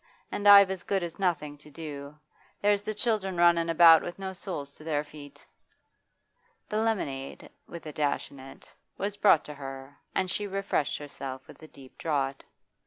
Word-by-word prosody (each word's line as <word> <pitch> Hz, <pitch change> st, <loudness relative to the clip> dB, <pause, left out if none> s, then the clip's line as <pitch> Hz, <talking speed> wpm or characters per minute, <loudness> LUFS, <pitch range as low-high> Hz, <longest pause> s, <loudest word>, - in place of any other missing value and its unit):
And 205 Hz, -, -1 dB
I've 200 Hz, -1 st, +9 dB
as 190 Hz, -2 st, -4 dB
good 195 Hz, 0 st, -1 dB
as 170 Hz, +1 st, -6 dB
nothing 150 Hz, -6 st, -1 dB
to 150 Hz, -, -16 dB
do. 145 Hz, -1 st, -8 dB, 0.4 s
There's 205 Hz, 0 st, +2 dB
the 215 Hz, +1 st, -4 dB
children 210 Hz, -5 st, -1 dB
runnin' 170 Hz, -1 st, +4 dB
about 165 Hz, -1 st, +8 dB
with 175 Hz, -, -7 dB
no 190 Hz, -1 st, -5 dB
soles 160 Hz, -7 st, -6 dB
to 155 Hz, -, -14 dB
their 150 Hz, -2 st, -1 dB
feet.' 145 Hz, -1 st, -13 dB, 1.2 s
The 215 Hz, +1 st, 0 dB
lemonade 140 Hz, -12 st, -3 dB, 0.2 s
with 170 Hz, -1 st, -9 dB
a 155 Hz, -, -6 dB
dash 145 Hz, -1 st, -1 dB
in 140 Hz, -, -13 dB
it 135 Hz, +1 st, -13 dB, 0.2 s
was 200 Hz, +1 st, -3 dB
brought 200 Hz, -6 st, +4 dB
to 150 Hz, -, -8 dB
her, 135 Hz, 0 st, -9 dB, 0.2 s
and 185 Hz, -1 st, 0 dB
she 205 Hz, +1 st, -1 dB
refreshed 195 Hz, -6 st, -1 dB
herself 135 Hz, -2 st, -8 dB
with -, -, -15 dB
a 155 Hz, -, -11 dB
deep 135 Hz, -3 st, -16 dB
draught. 140 Hz, -4 st, -2 dB
165 Hz, 175 wpm, -28 LUFS, 145-195 Hz, 1.2 s, I've